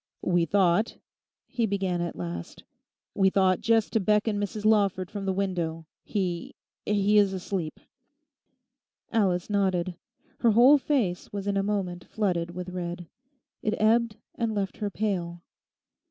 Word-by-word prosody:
'We 175 -2 +2
thought,' 195 +2 +2 0.5
he 235 -3 -1
began 190 -3 -1
at 170 - -3
last, 85 -1 -6 0.5
'we 195 -1 +4
thought 190 -1 +2
just 225 -1 +2
to 225 - +3
beckon 210 +1 +1
Mrs 205 +1 -4
Lawford 200 -4 +2
from 200 -2 -5
the - - +2
window. 175 -4 -2 0.2
He—he 200 +2 -1
is 200 -2 +3
asleep.' 180 -3 -4 1.3
Alice 190 -6 +1
nodded. 190 -3 0 0.5
Her 230 -2 +4
whole 255 +6 +7
face 240 -12 -1
was 200 -1 -4
in 200 0 0
a 195 - +2
moment 195 -3 -2
flooded 180 -6 -1
with 180 0 -5
red. 175 -1 -5 0.6
It 215 - 0
ebbed 225 0 +3 0.2
and 225 -2 -2
left 195 -2 -2
her 210 -2 -2
pale. 175 -5 -3
195 Hz, 140 wpm, -27 LUFS, 180-210 Hz, 1.3 s, whole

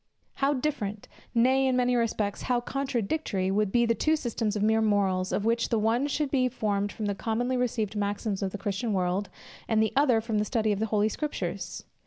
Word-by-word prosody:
How 280 +1 +3
different, 220 -7 -3 0.3
nay, 260 +3 +4
in 260 - +2
many 250 0 +2
respects, 220 -4 -1
how 250 -1 +1
contradictory, 240 -6 -1
would 205 0 +1
be 240 +2 +3
the 230 - +3
two 310 +7 +2
systems 230 -6 -2
of 210 - 0
mere 220 +1 +3
morals, 195 -3 +1
of 210 - -1
which 230 +1 +1
the 230 - +2
one 225 +6 +1
should 290 -1 -1
be 255 -2 +2
formed 205 -4 -1
from 215 - -5
the 205 - 0
commonly 240 +5 -1
received 225 -4 -1
maxims 205 0 -2
of 195 - 0
the 205 - -5
Christian 205 +3 -2
world, 185 +1 0 0.4
and 220 -1 +2
the 220 0 +2
other 270 -5 +4
from 220 -1 -1
the - - +2
study 220 -1 +1
of 200 - -1
the 220 - 0
Holy 210 0 +2
Scriptures! 300 +7 -4
220 Hz, 210 wpm, -28 LUFS, 205-250 Hz, 0.4 s, nay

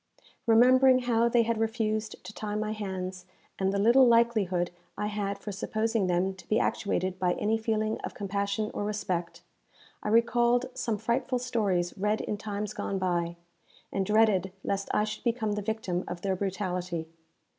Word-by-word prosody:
Remembering 255 +3 +6
how 235 -1 +2
they 235 0 +4
had 230 -1 -1
refused 220 -1 -1
to - - -9
tie 210 -1 -4
my 215 0 -1
hands, 185 -3 -5 0.3
and 190 0 +2
the 200 - -1
little 240 +6 +6
likelihood 215 -7 +3 0.3
I - - -1
had 205 -1 -2
for 210 - -6
supposing 215 +1 -1
them 180 +2 +1
to - - -15
be 215 - +3
actuated 185 -2 -1
by 180 -1 +2
any 215 +4 0
feeling 220 -1 -1
of - - -6
compassion 200 +1 -2
or - - -3
respect, 185 -5 -3 0.6
I - - -3
recalled 240 +2 +3
some 225 -3 -2
frightful 240 +4 0
stories 205 -8 0
read 210 +2 +1
in 210 - -3
times 210 -1 -4
gone 195 - -3
by, 175 -2 -1 0.6
and 195 - +1
dreaded 210 -2 +3
lest 200 0 -2
I 210 - +2
should 215 0 -5
become 230 -3 0
the 210 0 -1
victim 200 -4 -2
of 175 0 -5
their 190 -1 +1
brutality. 180 -3 -3
210 Hz, 165 wpm, -29 LUFS, 190-225 Hz, 0.6 s, Remembering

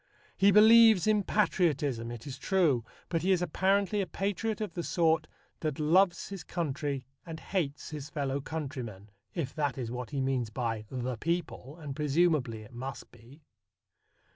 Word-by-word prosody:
He 195 - +5
believes 220 -1 +7
in 215 -1 +3
patriotism, 150 - +1
it 120 -1 -8
is 135 -2 -7
true, 160 -12 +2 0.2
but 165 -2 -1
he 190 - +2
is 180 -2 +3
apparently 195 +4 +1
a 190 - -2
patriot 205 +5 -2
of 215 -2 -4
the 175 - -3
sort 160 -2 +1 0.3
that 155 -3 -2
loves 175 +4 +3
his 195 -5 -7
country 145 -6 -3 0.2
and 160 -1 -7
hates 160 -6 -3
his 150 -2 -6
fellow 140 -2 -2
countrymen 130 -10 -6 0.2
(if 150 -7 -3
that 145 -4 -1
is 120 -3 -4
what 125 -1 -5
he 140 - -3
means 130 -3 0
by 115 -2 -3
"the 125 -2 -3
people," 165 -1 -3
and 145 -4 -6
presumably 150 -6 +1
it 120 - -15
must 130 +2 -7
be). 120 +6 -17
150 Hz, 165 wpm, -30 LUFS, 130-180 Hz, 0.3 s, believes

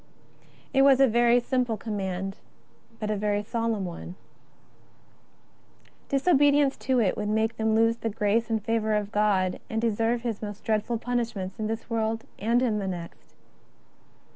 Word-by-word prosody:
A 260 -3 +5
simple 245 -3 0
command, 195 -2 -4 0.6
but 215 -1 -2
a - - 0
very 205 0 0
solemn 225 -2 -2
one. 175 0 -7 1.9
Diso 280 +5 +3
bedience 285 0 +4
to 260 -2 +1
it 200 -5 +2
would 210 0 -3
make 220 +1 0
them 220 0 +1
lose 225 +1 +3
the 225 - -3
grace 220 +2 0
and 220 -2 -1
favour 220 -1 +1
of 210 -1 -2
God, 200 -4 +1
and 220 - -1
deserve 230 +1 0
His 230 -4 -3
most 205 -1 -7
dreadful 220 +2 0
punish 240 0 -2
ments 190 0 -6
in 215 - -1
this 225 +1 -4
world 225 -1 -1 0.2
and 235 +4 +2
in 220 -4 +1
the 195 - -3
next. 175 -2 -8
220 Hz, 150 wpm, -26 LUFS, 210-235 Hz, 1.9 s, A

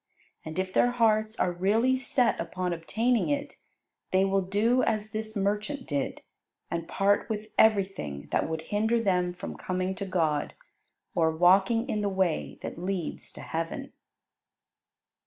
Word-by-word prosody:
And 160 +1 -7
if 185 0 -2
their 245 - +4
hearts 220 -2 +2
are 180 - +2
really 215 +9 +2
set 255 -2 +1
upon 180 +1 -2
obtaining 225 - 0
it, 285 0 -2 0.5
they 190 +1 +3
will 195 0 +2
do 210 +7 +2
as 215 0 -1
this 220 0 -4
merchant 210 +7 -1
did, 140 -3 -3 0.5
and 170 -1 -3
part 200 +1 +1
with 215 0 -4
everything 195 - +2
that - - +1
would 160 0 -3
hinder 220 +3 +2
them 180 -5 +1
from 175 - -7
coming 185 0 -2
to 200 - -5
God, 160 -5 0 0.6
or 165 -1 +3
walking 190 +8 +4
in 215 -6 -1
the 205 - 0
way 190 -4 -1
that - - -6
leads 185 -3 -4
to - - -10
heaven. 165 0 -4
195 Hz, 150 wpm, -28 LUFS, 175-220 Hz, 0.6 s, their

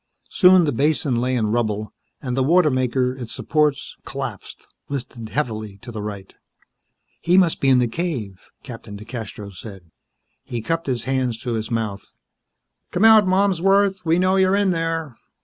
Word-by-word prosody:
Soon 185 -2 +6
the 150 - +1
basin 145 +1 +1
lay 125 +2 0
in 110 -3 0
rubble, 110 -2 -1 0.3
and 125 -2 -2
the 135 - +1
water 160 +3 +4
maker, 130 0 0
its 125 -3 -8
supports 150 -2 0
collapsed, 135 -7 -7 0.2
listed 120 -5 -6
heavily 110 -8 -3
to 120 - -8
the 110 -2 -6
right. 100 -2 -7 0.9
"He 180 +2 +2
must 180 -4 +3
be 135 - +3
in 130 - +5
the 125 -1 +2
cave," 115 - -5 0.2
Captain 115 -5 -9
DeCastros 105 -3 -8
said. 95 -6 -11 0.5
He 120 - -5
cupped 165 +2 -2
his 125 -4 -1
hands 130 -3 -1
to 120 - -2
his 110 -1 -3
mouth. 110 -4 -3 0.9
"Come 190 +5 +1
out, 220 -3 +7
Malmsworth, 195 +1 +2
we 165 0 +2
know 185 +1 +2
you're 190 0 +3
in 200 -2 +2
there!" 165 -5 -3
130 Hz, 165 wpm, -21 LUFS, 115-165 Hz, 0.9 s, out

